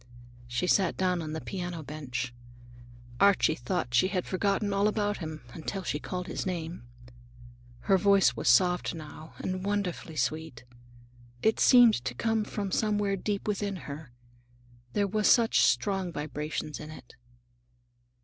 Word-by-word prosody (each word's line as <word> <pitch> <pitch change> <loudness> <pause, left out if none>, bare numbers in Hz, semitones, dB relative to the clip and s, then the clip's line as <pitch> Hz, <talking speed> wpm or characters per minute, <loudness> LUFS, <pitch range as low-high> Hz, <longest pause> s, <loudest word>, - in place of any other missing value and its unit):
She 120 +8 -1
sat 185 0 +2
down 180 -2 +1
on 155 -1 -5
the 160 - -3
piano 175 -4 -5
bench. 130 -5 -5 0.9
Archie 200 -5 +4
thought 120 -2 -3
she 125 +10 +4
had 185 -2 -2
forgotten 200 +2 0
all 200 +1 +3
about 205 -1 0
him, 155 -4 -7
until 190 +4 -5
she 145 - -2
called 180 +3 -5
his 170 - -4
name. 170 -7 -5 0.9
Her 190 +10 +3
voice 195 -9 +4
was 115 - 0
soft 180 +7 +3
now, 155 0 -10
and 185 0 -3
wonderfully 195 -5 -2
sweet. 155 -1 -2 0.8
It 220 - +3
seemed 240 - +6
to 120 -1 -4
come 225 - 0
from 200 -2 -4
somewhere 205 -1 +1
deep 200 +2 -3
within 205 -1 -1
her, 145 -1 -8 0.8
there 205 - +2
were 215 +2 -1
such 230 +1 +5
strong 195 -3 +2
vibrations 150 0 -4
in 155 - -8
it. 140 -6 -12
180 Hz, 145 wpm, -29 LUFS, 155-200 Hz, 0.9 s, seemed